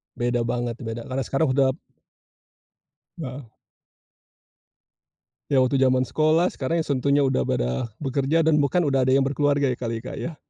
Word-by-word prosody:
Beda 120 -1 -1
banget, 120 -1 -2
beda 115 -1 -5
karena 130 +1 -2
sekarang 140 +1 0
udah 135 0 +2 1.4
Heeh. 135 -2 -6 2.1
Ya, 130 -2 +4
waktu 130 +1 +1
zaman 130 -1 +3
sekolah 155 +5 +2
sekarang 160 +5 -1
yang - - -14
tentunya 140 +2 +2
udah 130 - 0
pada 60 - -1 0.2
bekerja 140 +4 +1
dan 155 -1 +3
bahkan 155 +5 +2
udah 135 -3 +1
ada 130 - +4
yang 135 - +3
berkeluarga 145 -1 +1
ya 120 - -4
kali, 115 -1 -4
Kak, 130 - -7
ya. 165 -2 -5
135 Hz, 155 wpm, -24 LUFS, 125-145 Hz, 2.1 s, Ya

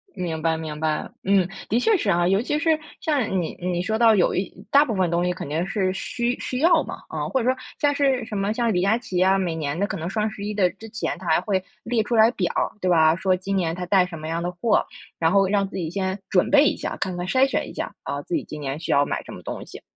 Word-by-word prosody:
明 165 -3 -3
白 165 0 +1
明 155 -2 -6
白， 155 -1 -1
嗯， 190 -2 +3 0.2
的 230 - +2
确 420 - +3
是 220 - -3
啊。 175 -1 +3
尤 195 +2 +3
其 295 +4 -1
是 320 -1 +2 0.2
像 250 - 0
你 160 - -4
你 175 0 -1
说 220 +4 -1
到 230 -1 +6
有 185 -4 +2
一 190 - -2 0.2
大 285 +1 +6
部 230 - -2
分 185 -3 +1
东 170 +1 +1
西 180 - +1
肯 175 - -7
定 165 +4 -1
是 190 -2 0
需 240 +5 -2
需 255 - -3
要 330 0 +4
嘛， - - -7
嗯。 150 -1 -2
或 265 - +1
者 255 - +2
说 260 - +1 0.2
像 290 -1 +3
是 270 -4 +2
什 210 - -5
么 200 +2 0
像 235 -1 +1
李 180 - +1
佳 200 +4 +3
琪 190 -7 -3
啊， 195 +1 +4
每 175 -4 -1
年 150 -1 -3
的 200 - +1
可 - - -4
能 165 +1 -4
双 215 +2 -1
11 210 0 -5
之 200 +2 0
前 225 -5 -3
他 185 - -11
还 160 +1 +3
会 190 -2 -1 0.2
列 230 -1 0
出 235 +2 -1
来 220 +1 +6
表 180 -7 -2
儿 - - +1
对 185 - 0
吧？ 160 -1 +5
说 185 0 +1
今 195 +2 -3
年 165 -3 0
他 180 +1 -4
带 185 -1 +4
什 170 -2 -8
么 155 - -6
样 165 +1 -2
的 175 - -2
货， 210 +5 +1 0.3
然 165 0 +2
后 195 -1 +4
让 200 0 +1
自 195 - -7
己 165 -3 -2
先 190 +2 -2
准 180 - +3
备 295 0 +6
一 - - +1
下， - - -4
看 185 -2 -3
看 175 - -3
筛 265 +5 +4
选 - - -1
一 - - -9
下， - - -4
啊， - - -3
自 350 - -3
己 310 - -1
今 150 -1 -8
年 140 +2 -3
需 160 - -3
要 140 - +5
买 - - -3
什 - - -11
么 - - -9
东 - - -6
西。 - - -11
190 Hz, 300 characters per minute, -23 LUFS, 175-225 Hz, 0.3 s, 到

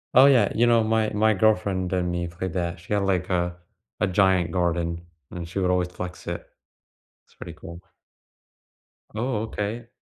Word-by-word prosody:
Oh, 130 +2 +9
yeah. 120 -8 +4
You 120 +2 +3
know, 115 -1 +4
my 110 0 +1
my 110 +1 +3
girlfriend 100 -3 +1
and 90 -1 0
me 85 0 -2
played 85 +1 -5
that. 85 -2 -2
She 85 +4 -5
had, 100 - +2
like, 90 -2 0
a 90 -1 0 0.4
a 105 - +2
giant 95 -2 +2
garden, 85 -1 -1 0.3
and 85 -1 -6
she 90 - -6
would 90 -1 +1
always 90 -1 +1
flex 90 0 -7
it. - - -4 0.8
It's - - -28
pretty - - -9
cool. 85 +1 -10 1.3
Oh, 110 0 -1
okay. 110 +2 -4
95 Hz, 175 wpm, -25 LUFS, 90-110 Hz, 1.3 s, Oh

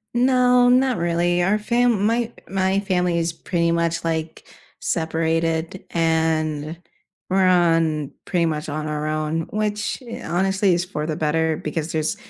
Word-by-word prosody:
No, 250 0 +4
not 255 0 +3
really 175 +1 +1
our 195 +4 +2
fam 235 -1 +1
my 230 +1 +1 0.2
my 190 0 +1
family 180 -3 0
is 165 0 -1
pretty 170 0 -1
much, 170 0 0
like, 160 -1 -3 0.3
separated, 165 +1 -1
and 160 -1 0 0.5
we're 190 0 +3
on 165 -5 +2
pretty 175 -2 +1
much 155 -1 -2
on 155 +1 -3
our 150 0 -3
own, 155 +1 -2
which 215 +4 -2
i 235 - -7
honestly 190 +1 +1
is 175 0 -1
for 150 -5 -4
the 155 - -2
better, 160 +1 0
because 155 +1 -4
there's 155 -1 -1
170 Hz, 145 wpm, -22 LUFS, 160-195 Hz, 0.5 s, No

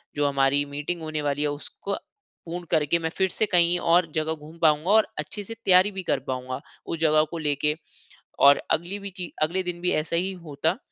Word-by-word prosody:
जो 145 0 +2
हमारी 140 0 +2
मीटिंग 150 +4 -3
होने 155 -1 -3
वाली 140 +1 -2
है 150 - +2
उसको 200 +6 -5 0.5
पूर्ण 175 +1 -6
करके 160 +1 +2
मैं 160 -1 -2
फिर 190 -1 +2
से 215 - 0
कहीं 175 0 +4 0.2
और 175 -2 +4
जगह 160 0 0
घूम 155 +1 -12
पाऊँगा 155 +1 +3
और 220 0 +5
अच्छे 170 +8 -3
से 225 - -7
तैयारी 185 +2 +6
भी 190 -1 -5
कर - - +2
पाऊँगा 130 0 -4 0.2
उस 165 - -4
जगह 155 -1 +4
को 170 - -4
लेके। 150 -1 0 0.7
और 140 0 +7
अगली 175 +5 0
भी 200 0 -7
ची 180 -3 -5
अगले 175 +5 +1
दिन 175 -1 -5
भी 180 - 0
ऐसा 155 +2 0
ही 185 +3 0
होता। 165 -1 -2
160 Hz, 210 wpm, -25 LUFS, 150-180 Hz, 0.7 s, और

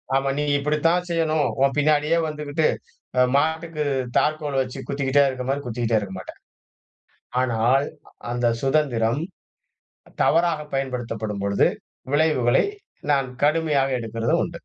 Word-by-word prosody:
ஆமா 135 0 +1
நீ 150 - 0
இப்டித்தான் 165 +5 +1
செய்யணும். 160 -3 +1 0.2
உன் 135 -1 +3
பின்னாடியே 150 +2 +3
வந்துகிட்டு, 150 0 -1 0.5
அ - - +6 0.2
மாட்டுக்கு 160 +1 0 0.4
தாற்கோல் 150 -3 0
வச்சு 130 +1 -7
குத்திக்கிட்டே 140 0 +2
இருக்க 130 -1 -5
மாரி, 140 +1 0
குத்திக்கிட்டே 115 -1 0
இருக்க 100 -2 -7
மாட்டேன். - - -10 1.0
ஆனால் 125 +3 +2 0.5
அந்த 120 0 +1
சுதந்திரம், 135 -3 +1 1.0
தவறாக 165 -1 +3
பயன்படுத்தப்படும் 115 -6 -3
பொழுது 100 0 +3 0.5
விளைவுகளை 145 -6 +3 0.5
நான் 135 -2 +1 0.2
கடுமையாக 145 -4 +2
எடுக்குறதும் 115 +8 0
உண்டு. - - -6
140 Hz, 115 wpm, -23 LUFS, 120-155 Hz, 1.0 s, அ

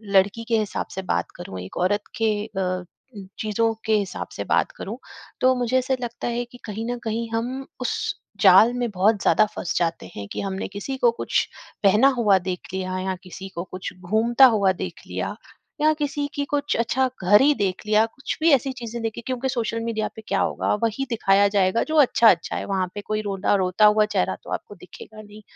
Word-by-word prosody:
लड़की 205 +4 +3
के 230 - +3
हिसाब 210 - -2
से 190 - -3
बात 185 - -2
करूँ, 95 - -8
एक 90 - -9
औरत 205 +4 +1 0.2
के 225 -1 +2 0.2
अ, 185 -3 -2 0.6
चीज़ों 225 +1 +1
के 220 - +2
हिसाब 195 -3 -3
से - - -3
बात - - +1
करूँ - - -6 0.4
तो 255 0 +4
मुझे 250 0 +1
ऐसा 260 +1 +1
लगता 240 -1 -4
है 240 0 -2
कि 245 +1 -15
कहीं 220 +1 -5
न 245 - -3
कहीं 225 +1 -2
हम 250 +4 -2 0.2
उस 250 - -1 0.5
जाल 235 +2 +7
में 245 -1 -1
बहुत 200 +2 +2
ज़्यादा 215 - +4
फँस 170 - -3
जाते 170 -1 -1
हैं, 100 -1 -6
कि - - -3
हमने 195 -1 -3
किसी 205 +7 -5
को 240 -2 +4
कुछ 235 - -1 0.4
पहना 210 +7 +6
हुआ 205 -5 +4
देख 180 -1 -4
लिया 185 0 -3
या 190 -1 -1
किसी 190 +1 -9
को 170 - -3
कुछ 185 0 -7
घूमता 225 +7 +4
हुआ 195 -2 +3
देख 185 - -6
लिया, - - -4 0.5
या 310 0 +5
किसी 290 -1 -2
की 285 - -1
कुछ 290 0 0
अच्छा 255 +3 +1 0.2
घर 205 +3 +6
ही 290 +2 +5
देख 195 -5 -1
लिया, 215 +1 +4
कुछ 230 +4 -6
भी 330 - +5
ऐसी 270 0 +2
चीज़ें 235 -2 -6
देखी 225 +1 -3
क्योंकि 260 0 -2
सोशल 230 -3 -2
मीडिया 220 -2 -1
पे 220 - -9
क्या 195 - +1
होगा, - - 0
वही 230 +4 0
दिखाया 200 -3 +3
जाएगा 190 +2 +3
जो 315 - -2
अच्छा-अच्छा 225 -9 +4
है। - - -3
वहाँ 190 -2 -1
पे 205 - -4
कोई 215 +1 -2
रोता 200 -1 0
रोता 185 +4 +3
हुआ 210 0 +5
चेहरा 205 -3 0
तो - - -10
आपको - - -6
दिखेगा 215 - -12
नहीं। 210 0 -13
215 Hz, 205 wpm, -23 LUFS, 195-240 Hz, 0.6 s, जाल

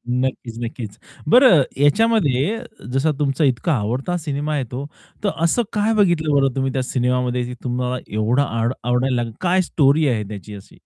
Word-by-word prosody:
नक्कीच, 125 -2 -2
नक्कीच. 115 -3 -7 0.3
बरं 245 - +7 0.2
याच्यामध्ये 175 - +2 0.3
जसा 135 +4 +2
तुमचा 145 +1 0
इतका 135 +4 +1
आवडता 130 +8 -1
सिनेमा 150 -1 -3
येतो, 130 +1 -5 0.4
तर 200 - +2
असं 205 +9 +2
काय 210 +1 +1
बघितलं 175 -7 +2
बरं 135 -2 +2
तुम्ही 135 0 0
त्या 130 -1 -1
सिनेमामध्ये 125 -1 -1
तुम्हाला 125 0 -1
एवढं 110 +6 +1
आड 115 -2 -1
आवडायला 125 +1 +1
लागेल? 120 -1 -2
काय 185 +1 +2
स्टोरी 150 -2 +2
आहे 115 -4 0
त्याची 105 0 -8
अशी? 100 - -13
135 Hz, 155 wpm, -20 LUFS, 125-155 Hz, 0.4 s, बरं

